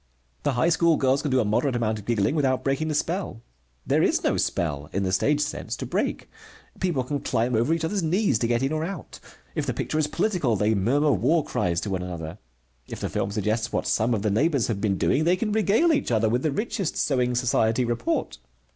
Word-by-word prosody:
The 145 - 0
high 125 +7 +2
school 165 -1 +3
girls 135 +1 +2
can 150 - -2
do 130 -1 +2
a 115 - +1
moderate 125 +6 +1
amount 110 -2 -1
of 100 - -12
giggling 115 +1 +1
without 135 -4 +1
breaking 135 +3 0
the 155 - -1
spell. 165 - -2 0.4
There - - +2
is - - +2
no - - +2
spell, 75 -3 -2
in 100 - -1
the 95 - -1
stage 145 +10 +2
sense, 150 - -3
to - - -6
break. - - -2 0.5
People 170 -9 0
can 145 +3 -3
climb 120 0 -1
over 120 +6 +2
each 165 0 0
other's 200 +4 -1
knees 170 - +1
to 115 - 0
get 120 +2 +1
in 135 - 0
or 155 0 -1
out. 175 -1 -7 0.3
If - - -2
the - - -1
picture 155 - -2
is 150 - +2
political, 160 - 0
they 105 +2 +2
murmur 135 +9 +2
war 160 +2 +2
cries 85 -1 -1
to 105 - -4
one 95 -1 -1
another. 85 -2 -6 0.5
If - - -7
the - - -3
film 95 - -2
suggests 110 +2 -1
what - - -1
some 115 +2 +1
of 105 - -3
the 105 - +1
neighbors 140 +3 +2
have 100 -3 -2
been 100 -3 +1
doing, 145 - +2
they 175 +3 +3
can 210 +3 -2
regale 220 +10 +3
each 290 - 0
other 110 -2 +2
with 120 +3 +1
the 155 - 0
richest 210 - -2
sewing 125 -3 +1
society 120 -1 +1
report. 120 0 -2
130 Hz, 230 wpm, -25 LUFS, 110-155 Hz, 0.5 s, school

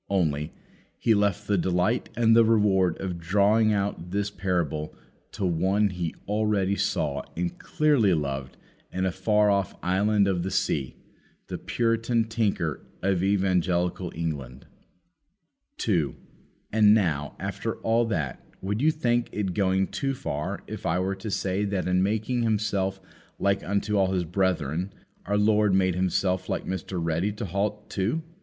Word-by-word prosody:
Only, 80 -5 0 0.5
He 115 - +3
left 100 -1 +1
the 100 -2 +1
delight 90 +7 +1
and 115 -1 +5
the 115 - +7
reward 100 -6 +3
of 90 -3 -4
drawing 105 +5 +3
out 100 -4 -1
this 100 +2 -1
parable 85 -6 -2 0.4
to 100 - -2
one 95 +4 +2
He 90 -3 -3
already 105 -2 +1
saw 70 -6 -1 0.2
and 90 0 -1 0.3
dearly 140 - +4
loved 70 -3 -3 0.3
in 95 0 -1
a 95 - +1
far 105 +3 +2
off 100 -1 0
island 100 +2 +2
of 95 -3 +1
the 95 - -2
sea, 70 -8 -1 0.5
the - - -4
Puritan 115 0 +1
tinker 110 - -1 0.2
of 95 -2 +2
Evangelical 90 -2 +1
England. 70 -6 -4 1.1
2. - - 0 0.6
And 105 -1 +6
now, 75 -9 0
after - - -3
all 115 +1 +2
that, 80 - -3 0.2
would 105 +4 -2
you 155 - +5
think 120 -6 0
it 95 -3 -2
going 95 -1 +2
too 135 +5 -2
far 75 - -4
if - - -7
I 85 - +1
were 95 +2 0
to 100 +3 -6
say 95 0 -1
that 100 -2 -1
in 90 0 +2
making 110 +5 0
Himself 100 -4 0 0.4
like 100 0 +1
unto 100 +1 0
all 95 -1 +2
His 90 -2 +1
brethren, 90 -1 0 0.4
our 100 +1 +1
Lord 105 -1 +3
made 95 -1 +3
Himself 95 +1 0
like - - -2
Mr. 95 0 -4
Ready 85 +4 0
to 105 +2 -5
halt 105 +3 -2
too? 115 +12 -1
95 Hz, 150 wpm, -26 LUFS, 90-105 Hz, 1.1 s, the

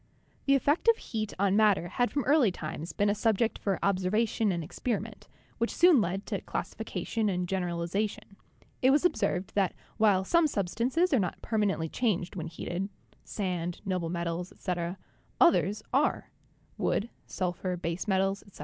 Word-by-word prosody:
The 275 - +5
effect 290 - +1
of 460 -1 +6
heat 215 -3 -4
on 195 0 +2
matter 210 -5 +4
had 245 +6 +1
from 285 - -1
early 275 -6 +4
times 160 -1 -6
been 205 - +1
a - - +2
subject 220 +1 +1
for 195 -2 0
observation 200 +3 +1
and 170 -2 -2
experiment, 215 +4 -4 0.3
which 230 - +1
soon 345 -8 +6
led 195 +1 -2
to - - -3
classification 220 -2 -3
and 180 -2 -1
generalization. 185 +3 -2 0.5
It 260 - +5
was 290 +6 +4
observed 200 - 0
that 195 -3 +1 0.2
while 205 -4 +4
some 335 - +3
substances 255 - 0
are 260 - +5
not 180 -4 -2
permanently 205 -7 0
changed 190 -3 -1
when 170 -3 -4
heated 175 +3 -4 0.3
(sand, 175 -4 -3
noble 180 -4 -1
metals, 170 +1 -3
etc.), 175 -1 -3 0.4
others 205 - +4
are 280 +3 +1 0.5
(wood, 230 +4 0 0.2
sul 180 -2 -2
phur, 180 0 -3
base 170 +2 -3
metals, 195 0 +1
etc.). 200 - -18
200 Hz, 160 wpm, -29 LUFS, 180-230 Hz, 0.5 s, of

